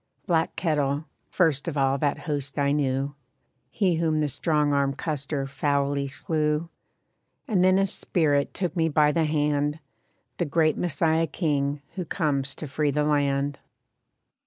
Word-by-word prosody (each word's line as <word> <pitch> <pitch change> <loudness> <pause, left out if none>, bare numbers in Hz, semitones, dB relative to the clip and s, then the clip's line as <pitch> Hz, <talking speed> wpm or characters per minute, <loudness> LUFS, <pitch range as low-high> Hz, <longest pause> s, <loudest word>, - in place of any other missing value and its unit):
Black 165 -2 +1
Kettle, 150 -3 0 0.2
first 160 -6 +1
of 155 -3 -2
all 135 0 +2
that 145 0 +1
host 145 -2 -3
I 140 -1 +2
knew, 140 -1 0 0.6
He 180 +2 +1
whom 160 -2 +1
the 150 -1 +1
strong 150 +1 +1
armed 140 -1 +1
Custer 145 -2 -2
foully 140 0 0
slew. 150 +3 -1 0.8
And 190 -5 +2
then 185 0 +5
a 195 - +3
spirit 150 -6 0
took 180 -1 -3
me 165 -2 +2
by 150 -1 +4
the 160 +1 +1
hand, 150 -1 0 0.6
The 175 - 0
Great 155 +1 +2
Messiah 165 0 +1
King 145 -3 -1
who 185 -2 -4
comes 140 -5 -1
to 155 - -6
free 145 +2 0
the 150 +1 +1
land. 145 -1 +1
150 Hz, 150 wpm, -26 LUFS, 140-160 Hz, 0.8 s, then